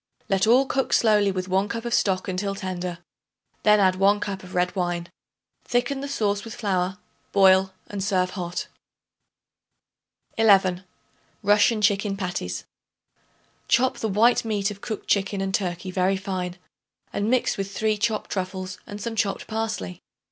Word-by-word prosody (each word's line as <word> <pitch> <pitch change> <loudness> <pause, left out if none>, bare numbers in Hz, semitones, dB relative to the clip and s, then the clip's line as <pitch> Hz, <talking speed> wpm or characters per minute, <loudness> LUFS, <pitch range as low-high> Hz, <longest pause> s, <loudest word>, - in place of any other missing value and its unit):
Let 195 +2 +2
all 250 +4 +5
cook 270 0 -1
slowly 210 -3 +4
with 185 -1 -3
1 190 +2 +1
cup 230 +2 -4
of 235 - -2
stock 190 -4 +1
until 195 +1 -2
tender; 180 -2 -4 0.6
then 210 0 +5
add 185 -2 +3
1 200 +2 +4
cup 200 -2 -4
of 185 0 -10
red 180 +1 +1
wine. 175 -2 -2 0.5
Thicken 245 +3 0
the 280 - -4
sauce 205 -7 -1
with 225 - -8
flour, 190 -3 -1 0.3
boil 190 -1 +5
and 200 -2 -5
serve 185 -2 +1
hot. 175 -2 -4 1.7
11. 190 -4 +4 0.6
Russian 210 +2 +4
Chicken 200 -1 +2
Patties. 135 - -4 1.0
Chop 255 +2 +2
the 220 - -1
white 225 +5 +4
meat 210 -3 -1
of 200 -1 -10
cooked 215 - -5
chicken 200 0 +1
and 190 0 -2
turkey 185 -1 -2
very 185 +1 +1
fine 185 -2 -4 0.6
and 205 +2 -1
mix 255 +1 +2
with 195 0 -3
3 215 +1 0
chopped 215 0 -1
truffles 185 -1 -4
and 205 0 -7
some 225 +2 -4
chopped 200 -2 -1
parsley. 220 - -4
195 Hz, 155 wpm, -24 LUFS, 185-215 Hz, 1.7 s, all